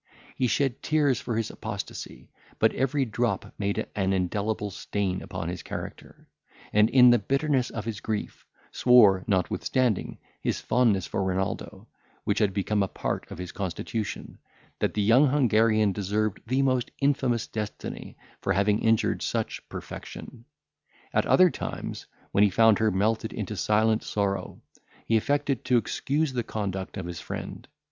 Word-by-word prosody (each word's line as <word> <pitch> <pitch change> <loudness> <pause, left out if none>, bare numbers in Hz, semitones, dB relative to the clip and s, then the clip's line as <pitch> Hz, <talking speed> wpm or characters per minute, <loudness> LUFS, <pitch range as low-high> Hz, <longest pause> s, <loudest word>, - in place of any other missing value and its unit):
He 125 - +1
shed 135 0 0
tears 145 -6 +2
for 115 - -2
his 115 - -1
apostasy; - - -7 0.3
but - - +3
every 135 +1 +1
drop 115 -3 -2
made 100 -1 -1
an 95 -1 +1
indelible 100 +3 -1
stain 95 -1 -2
upon 80 - -5
his 90 0 -4
character; - - -8 0.5
and, 105 +1 +5
in 125 -1 +7
the 120 - +5
bitterness 135 +3 +1
of 115 -2 -5
his 110 -3 -4
grief, 110 -2 -4 0.2
swore, 105 -7 +6
notwithstanding 105 +3 0 0.2
his - - -1
fondness 105 -8 +2
for 95 - -2
Renaldo, 95 0 -3 0.4
which - - 0
had 105 -2 +3
become 100 +2 0
a 100 - +1
part - - -4
of - - -8
his 90 0 -6
constitution, 100 +3 -4 0.4
that - - 0
the 105 - +1
young 120 +8 +6
Hungarian 110 -6 +3
deserved 105 +1 -1
the 130 +3 +2
most 130 -2 +1
infamous 130 -5 +1
destiny 105 -2 -6 0.2
for - - +1
having 100 +3 +2
injured 115 -1 +2
such - - -2
perfection. - - -9 0.7
At - - +2
other 185 -2 +6
times, - - -6 0.2
when 100 - +4
he 105 - +5
found 110 +2 +4
her 110 0 +3
melted 110 +3 0
into 105 0 -4
silent 110 +4 +2
sorrow, 100 -1 -2 0.4
he 115 - +2
affected 140 +2 +1
to 125 - +4
excuse 140 +6 -1
the 125 - 0
conduct 100 -4 -4
of 95 - -4
his 85 -2 -6
friend. - - -7
110 Hz, 155 wpm, -27 LUFS, 100-125 Hz, 0.7 s, in